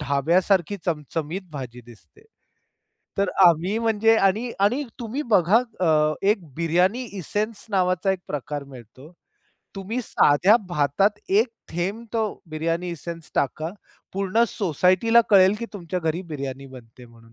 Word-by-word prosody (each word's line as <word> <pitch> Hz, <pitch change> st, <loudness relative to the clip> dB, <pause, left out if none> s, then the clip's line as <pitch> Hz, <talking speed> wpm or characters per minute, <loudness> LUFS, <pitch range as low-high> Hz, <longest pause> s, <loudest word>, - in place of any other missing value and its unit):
ढाब्यासारखी 170 Hz, +7 st, +1 dB
चमचमीत 160 Hz, +2 st, -3 dB
भाजी 125 Hz, -4 st, -7 dB
दिसते. 120 Hz, -, -18 dB, 1.0 s
तर 200 Hz, -1 st, +1 dB, 0.2 s
आम्ही 175 Hz, +5 st, +3 dB
म्हणजे 225 Hz, 0 st, +3 dB
आणि 215 Hz, +4 st, +1 dB
आणि 230 Hz, +9 st, +2 dB, 0.2 s
तुम्ही 240 Hz, +5 st, -4 dB
बघा 190 Hz, +1 st, +5 dB, 0.3 s
अ, 155 Hz, -1 st, +3 dB
एक 200 Hz, -1 st, +1 dB
बिर्याणी 180 Hz, +8 st, +1 dB
एसेन्स 210 Hz, +4 st, -3 dB
नावाचा 185 Hz, -1 st, +1 dB
एक 190 Hz, -, -3 dB
प्रकार 145 Hz, 0 st, -4 dB
मिळतो. 130 Hz, +3 st, -14 dB, 0.7 s
तुम्ही 205 Hz, +6 st, -3 dB
साध्या 185 Hz, +2 st, +4 dB
भातात 175 Hz, +6 st, +1 dB
एक 215 Hz, +6 st, +3 dB, 0.2 s
थेंब 190 Hz, +7 st, -3 dB
तो 225 Hz, -, +1 dB, 0.3 s
बिर्याणी 165 Hz, +3 st, -2 dB
एसेन्स 170 Hz, 0 st, -8 dB
टाका. 155 Hz, +4 st, -1 dB, 0.4 s
पूर्ण 195 Hz, +4 st, +1 dB
सोसायटीला 185 Hz, +5 st, +3 dB
कळेल 195 Hz, -1 st, +6 dB
की 235 Hz, -, -4 dB
तुमच्या 180 Hz, -1 st, -4 dB
घरी 165 Hz, +2 st, -2 dB
बिर्याणी 135 Hz, -2 st, -5 dB
बनते 125 Hz, -2 st, -14 dB
म्हणून. 115 Hz, -1 st, -19 dB
180 Hz, 130 wpm, -23 LUFS, 150-205 Hz, 1.0 s, कळेल